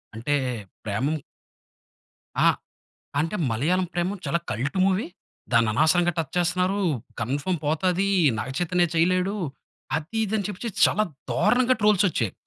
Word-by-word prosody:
అంటే, 145 +6 0 0.5
ప్రేమం 130 +10 0 1.3
ఆ! - - +8 0.7
అంటే, 165 +7 -1
"మలయాళం 175 +11 +1
'ప్రేమం' 180 +2 -2
చాలా 170 - +1
కల్ట్ 140 +10 -2
మూవీ. 195 +2 +1 0.5
దాన్ని 115 -1 +4
అనవసరంగా 175 +8 +3
టచ్ 160 -4 -2
చేస్తున్నారు, 180 +3 +1 0.4
కన్‌ఫర్మ్ 145 +9 -1
పోతది, 180 +6 +1 0.3
'నాగచైతన్య' 175 - 0
చేయలేడు," 185 +4 +2 0.6
అది, 160 +7 -5
ఇది 215 +1 -3
అని 200 - -2
చెప్పేసి 210 +3 -5 0.2
చాలా 215 - +1 0.3
దారుణంగా 255 +1 +3
ట్రోల్స్ 210 -1 +4
వచ్చాయి. 115 - -1
175 Hz, 120 wpm, -25 LUFS, 145-190 Hz, 1.3 s, ఆ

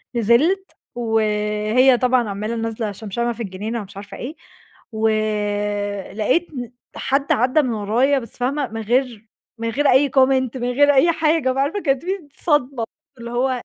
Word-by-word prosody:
نزلت 285 - +2 0.2
وهي 220 +2 +2
طبعًا 250 -3 +2
عمّالة 210 +3 -3
نازلة 225 -1 -3
شمشمة 215 +3 -4
مع 240 - 0
في 235 - -6
الجنينة 215 +4 -4
ومش 200 0 -12
عارفة 205 0 -9
إيه، 290 +6 -6 0.6
ولاقيت 210 - -1
ن 245 -3 -6 0.2
حَد 275 +1 0
عدّى 255 +6 +3
من 250 -4 -1
ورايا 235 +7 +2
بس 230 -4 -11
فاهمة؟ 270 +3 -1
من 225 0 -6
غير 235 -1 -1 0.3
من 230 0 -2
غير 285 +6 +1
أي 270 +2 +4
Comment 260 -1 +3
من 245 0 -1
غير 285 +3 +4
أي 305 +5 +5
حاجة 315 -4 +1
بقى 270 +1 +1
عارفة؟ 395 +9 -2
كانت 270 -4 0
في 370 - -1 0.3
صدمة 275 -6 +1 0.4
اللي 235 0 -7
هو 250 0 0
240 Hz, 165 wpm, -21 LUFS, 215-270 Hz, 0.6 s, أي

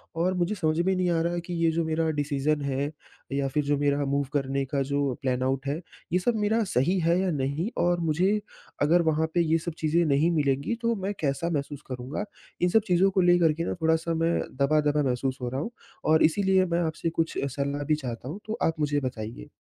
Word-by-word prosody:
और 175 +3 +1
मुझे 180 +4 0
समझ 160 -4 0
में 190 +2 +2
नहीं 180 -1 +1
आ 165 -1 +2
रहा 170 +1 0
है 175 - -1
कि 175 +1 -7
ये 165 - +4
जो 165 +1 0
मेरा 160 0 0
डिसीज़न 145 +1 0
है 140 +1 -1 0.4
या 140 0 0
फ़िर 145 +2 0
जो 145 0 +1
मेरा 145 0 +1
मूव 140 +1 0
करने 135 -1 0
का 140 0 -1
जो 140 -2 +1
प्लान 130 -1 0
आउट 135 +1 -1
है, 150 +5 -2 0.3
ये 180 - +4
सब 230 +5 +1
मेरा 220 +2 +2
सही 175 +10 +2
है 170 +2 +2
या 190 -1 +1
नहीं? 145 +6 -1
और 175 0 +2
मुझे 180 +6 +2 0.4
अगर 170 +4 +4
वहाँ 160 +1 +1
पे 175 - +4
ये 165 0 +2
सब 170 - -3
चीज़ें 165 +2 +2
नहीं 150 +3 +3
मिलेंगी 145 - +1
तो 230 0 +2
मैं 200 +2 -1
कैसा 150 +3 0
महसूस 145 -2 -3
करूँगा? 130 +10 -4 0.4
इन 180 - +3
सब 220 - +4
चीज़ों 185 +1 +4
को 190 - +2
लेकर 175 -3 +4
के 165 +2 -3
ना - - -1
थोड़ा-सा 160 +1 +1
मैं 165 +1 +1 0.2
दबा-दबा 150 +1 +2
महसूस 130 +1 -1
हो 120 - -2
रहा 130 +3 -3
हूँ 225 - -4 0.4
और 160 - +5
इसीलिए 190 +3 +3
मैं 175 - +2
आपसे 160 +1 -2
कुछ 165 0 -2 0.2
सलाह 140 +1 -2
भी 155 - +2
चाहता 125 -4 -6
हूँ, 175 +7 -6
तो 220 - -3
आप 160 -1 0
मुझे 145 -1 +1
बताइए? 115 - -5
155 Hz, 225 wpm, -27 LUFS, 140-175 Hz, 0.4 s, और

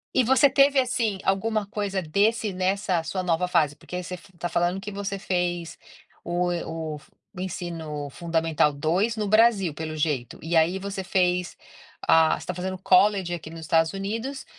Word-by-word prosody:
E 255 - +5
você 265 +4 +5
teve, 275 0 +4
assim, 235 -5 0
alguma 210 +2 0
coisa 200 -2 -2
desse 205 +5 +1
nessa 185 -1 0
sua 185 +3 -3
nova 180 +1 +1
fase? 155 -5 +2
Porque 180 - -10
aí 180 - -3
você 180 - -7
f 180 +2 -16
está 175 0 -3
falando 175 +3 0
que 205 +2 -7
você 200 0 -4
fez 175 -3 -2 0.5
o 175 +1 0 0.2
o 160 -2 -4 0.4
o 180 - -6
ensino 160 -6 -5
fundamental 165 -2 +1
2 180 +11 0
no 210 -1 -1
Brasil, 215 -6 +4
pelo 155 0 -5
jeito. 145 -6 -1
E 165 +1 -1
aí 165 +4 +3
você 195 0 -5
fez, 180 -1 0 0.5
ah 160 -1 +5
você - - -7
está 185 - -5
fazendo 185 +1 -4
college 190 -1 +3
aqui 160 -2 -6
nos 165 0 -9
Estados 160 0 +2
Unidos. 225 +8 -4
180 Hz, 175 wpm, -25 LUFS, 165-200 Hz, 0.5 s, E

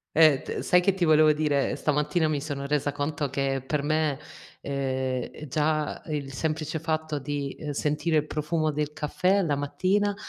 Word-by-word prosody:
Eh, 155 -3 +6
t - - -5
sai 180 - +4
che 190 +2 +2
ti 190 -2 0
volevo 155 -1 +6
dire: 150 -2 +1
stamattina 150 +2 +1
mi 150 -2 0
sono 140 -1 -4
resa 145 0 0
conto 145 0 -2
che 135 0 -1
per 145 +1 -1
me, 155 -1 +1 0.4
ehm, 130 -2 -1
è 155 - -9
già 155 +2 0
il 145 -3 -4
semplice 155 +3 -2
fatto 155 -1 -2
di, 140 0 -3
ehm, 150 - -5
sentire 150 +3 0
il 150 0 +2
profumo 155 +1 -1
del 150 0 -2
caffè 180 +6 +1
alla 170 -7 +2
mattina 190 +8 0
150 Hz, 175 wpm, -27 LUFS, 145-155 Hz, 0.4 s, Eh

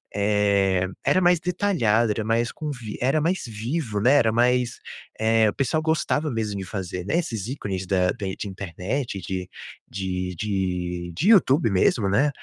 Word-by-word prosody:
Eh, 100 -2 +2 0.2
era 185 - +3
mais 175 -1 +4
detalhado, 165 - +1
era 110 +1 -2
mais 115 +2 0
com 155 - -6
vi 115 -6 -7
era 135 +5 +2
mais 170 +5 0
vivo, 115 +1 -3
né, 125 +7 +4
era 115 -6 +4
mais, 125 +1 +2 0.4
eh, 110 0 +3
o - - -4
pessoal 140 +4 0
gostava 155 -1 0
mesmo 110 -4 -2
de 95 - -5
fazer, 90 -2 -5
né, 160 - 0
esses 115 - -3
ícones 95 -8 -4
da 90 -1 +2
de 95 -2 -4
de - - -5
internet, 100 +5 -4
de 90 0 -5 0.4
de 90 -1 -3
de 90 -3 -2
de 190 +8 +1
YouTube 150 - +5
mesmo, 100 +2 +2
né, 135 +10 +3
110 Hz, 170 wpm, -24 LUFS, 95-135 Hz, 0.4 s, YouTube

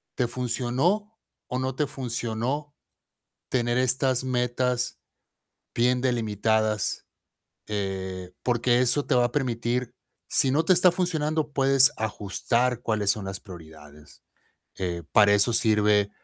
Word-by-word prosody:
¿Te 125 - 0
funcionó, 130 - -1 0.3
o 125 - -3
no 130 0 -2
te 150 0 -1
funcionó? 130 +3 -4 0.7
Tener 120 -1 0
estas 130 0 +2
metas, 125 -1 -1 0.7
bien 125 +1 +2
delimitadas. 110 -3 -1 0.6
Eh, 95 -3 -4
porque 120 0 +1
eso 135 +3 +3
te - - 0
va 125 -1 +3
a 120 - -2
permitir, 120 -2 -2 0.3
si 135 - +3
no 150 +5 +1
te 185 - +5
está 180 0 +5
funcionando, 155 -4 -1
puedes 135 0 +5
ajustar, 115 +3 -1
cuáles 105 -4 +1
son 105 -2 -4
las 95 -1 -5
prioridades. 80 -5 -14 0.5
Eh, 85 -2 -4
para 105 -1 +5
eso 105 +4 +3
sirve, 105 -3 +3
120 Hz, 120 wpm, -25 LUFS, 105-130 Hz, 0.7 s, te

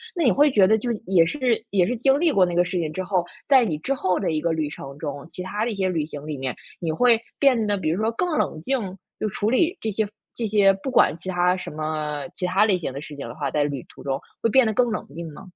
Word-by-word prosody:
那 340 - 0
你 245 - +5
会 295 +1 +5
觉 205 -7 +5
得 220 +3 +5
就 240 +2 -2
也 180 -3 +5
是 245 - 0
也 185 -3 +3
是 245 - -1
经 270 +4 +3
历 335 -2 +3
过 195 -7 +4
那 175 - -3
个 175 0 +4
事 180 0 -2
情 155 -2 -2
之 185 +3 -3
后， 185 -2 0 0.2
在 265 -3 +6
你 160 -9 -1
之 270 - -2
后 185 -8 0
的 190 - -1
一 155 -1 -1
个 170 - 0
旅 155 -2 -1
程 140 -1 -9
中， 145 -1 -6
其 180 - -7
它 205 +3 -2
的 240 - 0
一 - - -4
些 190 -1 0
旅 165 -4 0
行 145 -1 -8
里 155 -1 -4
面， 130 -1 -3 0.2
你 165 -2 -2
会 235 +5 +4 0.2
变 250 -6 +3
得 205 -1 +1
比 160 -4 -1
如 180 +6 0
说 225 +1 +1
更 355 +10 -1
冷 155 - -1
静？ 205 -5 -2 0.2
就 215 - -1
处 210 +3 -1
理 340 +8 +2
这 220 - -2
些 210 +1 0 0.3
这 230 -2 -2
些 200 -2 +5
不 195 +8 -5
管 205 - +4
其 185 - -6
它 180 0 +2
什 185 - -6
么 155 0 -3
其 180 - -2
它 195 +4 +3
类 190 -4 +2
型 145 - -4
的 135 - -6
事 150 -1 -9
情 140 -4 -6
的 120 - -8
话， 140 -4 -3
在 150 - +1
旅 140 -3 -3
途 - - -15
中 135 -1 -2 0.2
会 230 - +2
变 260 +1 +5
得 220 - 0
更 245 +1 +2
冷 215 - -3
静 165 -1 -7
吗？ 150 - -11
185 Hz, 315 characters per minute, -24 LUFS, 155-225 Hz, 0.3 s, 在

